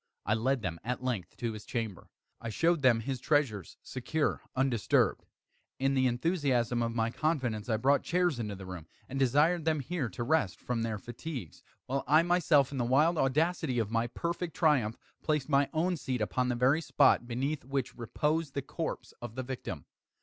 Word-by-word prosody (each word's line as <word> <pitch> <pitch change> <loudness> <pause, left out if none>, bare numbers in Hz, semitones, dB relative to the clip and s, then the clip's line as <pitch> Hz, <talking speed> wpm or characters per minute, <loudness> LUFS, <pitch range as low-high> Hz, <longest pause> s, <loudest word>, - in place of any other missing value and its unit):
I 105 - +2
led 125 +3 +1
them, 85 -2 -3
at 125 +3 -3
length, 120 -8 -3
to 115 -2 -2
his 105 -1 -8
chamber. 110 -6 -4 0.3
I 115 - -4
showed 165 +7 +2
them 120 -4 +4
his 130 +2 -3
treasures, 130 - 0
secure, 145 +4 -1
undisturbed. 130 -6 +2 0.5
In 135 +1 +1
the 130 -1 +3
enthusiasm 125 -3 +1
of 115 0 -1
my 115 -1 +1
confidence, 125 -8 -1
I 110 - +2
brought 140 +5 +3
chairs 175 -6 +1
into 105 -3 -3
the 95 0 -9
room, 90 -4 -8 0.2
and 135 +1 -4
desired 150 +6 +3
them 155 -1 +1
here 140 -2 -2
to 120 - -4
rest 120 - +1
from 120 -2 -2
their 115 -2 -1
fatigues, 120 - -7 0.2
while 135 +2 -1
I 155 +4 +6
myself, 165 -6 +3
in 135 - -3
the - - +2
wild 150 +7 +3
audacity 150 0 +1
of 110 -2 0
my 115 +1 +1
perfect 170 +6 -3
triumph, 135 -10 +2 0.2
placed 150 -2 0
my 140 -1 +3
own 175 +3 0
seat 130 -4 -2
upon 125 +4 0
the 125 - +1
very 130 +6 +3
spot 120 - +3
beneath 135 +5 -2
which 135 -1 -2
reposed 150 +5 -1
the 140 - -1
corpse 160 +4 -5
of 120 -2 -7
the 130 - -3
victim. 120 - -6
130 Hz, 185 wpm, -31 LUFS, 115-150 Hz, 0.5 s, I